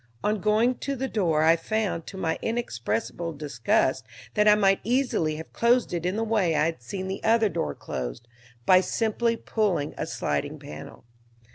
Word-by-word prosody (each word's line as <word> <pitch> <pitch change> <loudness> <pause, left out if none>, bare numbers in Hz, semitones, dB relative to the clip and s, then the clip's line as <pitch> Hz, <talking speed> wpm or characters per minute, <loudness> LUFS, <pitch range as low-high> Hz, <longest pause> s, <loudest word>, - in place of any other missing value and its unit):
On 210 -1 0
going 220 +4 +2
to 280 -1 -2
the 265 +1 -2
door 170 -10 +1
I 165 +1 +6
found, 200 -1 -2
to 195 - -8
my 165 -4 -1
inexpressible 165 - -2
disgust, 130 -4 0 0.3
that 210 0 +3
I 210 - +8
might 195 -2 +3
easily 235 - +1
have 160 +1 -9
closed 235 -3 +2
it 175 0 -1
in 185 - -1
the 225 - 0
way 210 -7 +1
I 150 0 +3
had 165 -5 -2
seen 190 +10 -5
the 190 +1 -5
other 225 -1 +4
door 75 - -2
closed, 65 - -6 0.4
by 185 0 +6
simply 230 +4 0
pulling 195 -12 -1
a - - -2
sliding 75 -1 -2
panel. 75 +1 -10
190 Hz, 175 wpm, -26 LUFS, 155-220 Hz, 0.4 s, I